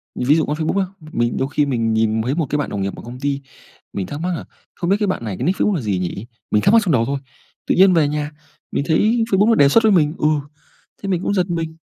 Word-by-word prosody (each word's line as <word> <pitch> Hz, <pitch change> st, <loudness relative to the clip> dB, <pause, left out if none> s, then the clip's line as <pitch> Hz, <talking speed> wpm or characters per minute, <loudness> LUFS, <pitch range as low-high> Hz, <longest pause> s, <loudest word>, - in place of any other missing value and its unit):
Mình 125 Hz, -, -3 dB
ví 150 Hz, -, +6 dB
dụ 160 Hz, -, +2 dB
con 150 Hz, -, -2 dB
Facebook 160 Hz, +5 st, 0 dB
á, 190 Hz, -, +1 dB, 0.3 s
mình 120 Hz, 0 st, 0 dB
đôi 130 Hz, -, 0 dB
khi 150 Hz, -, +2 dB
mình 115 Hz, -5 st, 0 dB
nhìn 110 Hz, 0 st, +1 dB
thấy 130 Hz, +6 st, -1 dB
1 165 Hz, -3 st, 0 dB
cái 150 Hz, -, 0 dB
bạn 145 Hz, -, -2 dB
đồng 100 Hz, -, -3 dB
nghiệp 95 Hz, 0 st, -3 dB
ở -, -, -10 dB
công 120 Hz, +2 st, -9 dB
ty, 140 Hz, 0 st, -2 dB, 0.5 s
mình 95 Hz, -2 st, -3 dB
thắc 145 Hz, -, -6 dB
mắc 180 Hz, 0 st, -1 dB
là -, -, -7 dB, 0.3 s
không 175 Hz, 0 st, -3 dB
biết 200 Hz, -, +4 dB
cái 210 Hz, -, +1 dB
bạn 185 Hz, -, -2 dB
này 105 Hz, -5 st, -4 dB
cái -, -, -3 dB
nick 185 Hz, +2 st, 0 dB
Facebook 210 Hz, -, +2 dB
là 155 Hz, -, -2 dB
gì 100 Hz, -4 st, -1 dB
nhỉ? 90 Hz, +4 st, -4 dB, 0.3 s
Mình 105 Hz, -, +3 dB
thắc 200 Hz, -, +3 dB
mắc 230 Hz, -, +7 dB
trong 170 Hz, -, +1 dB
đầu 115 Hz, -4 st, +3 dB
thôi. 140 Hz, +3 st, -2 dB, 0.5 s
Tự -, -, +2 dB
nhiên 190 Hz, 0 st, +6 dB
về 160 Hz, -4 st, +3 dB
nhà, 150 Hz, 0 st, -3 dB, 0.4 s
mình -, -, -1 dB
thấy 220 Hz, +8 st, +2 dB
Facebook 200 Hz, +2 st, +4 dB
nó 225 Hz, -, +5 dB
đề 140 Hz, -6 st, +5 dB
xuất 225 Hz, +9 st, +4 dB
với 220 Hz, -, +5 dB
mình, 155 Hz, -4 st, +3 dB
ừ, 150 Hz, -, +1 dB, 0.8 s
thế 195 Hz, -, -3 dB
mình 180 Hz, -3 st, 0 dB
cũng 200 Hz, -, 0 dB
giật 185 Hz, -2 st, 0 dB
mình. 165 Hz, -2 st, -3 dB
150 Hz, 300 wpm, -20 LUFS, 120-185 Hz, 0.8 s, mắc